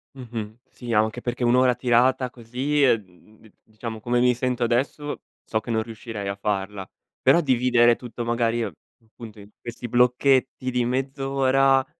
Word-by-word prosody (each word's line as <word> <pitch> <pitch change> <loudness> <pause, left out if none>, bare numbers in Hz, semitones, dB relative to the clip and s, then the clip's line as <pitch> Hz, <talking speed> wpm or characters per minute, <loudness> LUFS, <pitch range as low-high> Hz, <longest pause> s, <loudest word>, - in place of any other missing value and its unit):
Mh-mh, 115 -4 -7
sì 120 -2 -6
anche 110 +3 +1
perché 125 0 -3
1 120 0 +4
ora 125 -1 +4
tirata 125 +1 +2
così, 130 +5 -1
uhm, 105 -3 -1
d 110 - -19
diciamo 110 0 -8
come 120 +2 0
mi 125 0 +4
sento 125 0 -1
adesso, 135 +5 -1 0.2
so 110 - -1
che 120 - -12
non 110 -1 0
riuscirei 110 -3 -7
a 100 - -2
farla, 100 -1 -3 0.3
però 170 - +5
dividere 125 -4 +3
tutto 120 -1 -7
magari 115 0 0
appunto 110 -1 -11
in 100 0 -13
questi 120 0 -7
blocchetti 125 +2 +2
di 125 -1 0
mezz'ora. 135 +1 +1
120 Hz, 155 wpm, -24 LUFS, 110-130 Hz, 0.3 s, però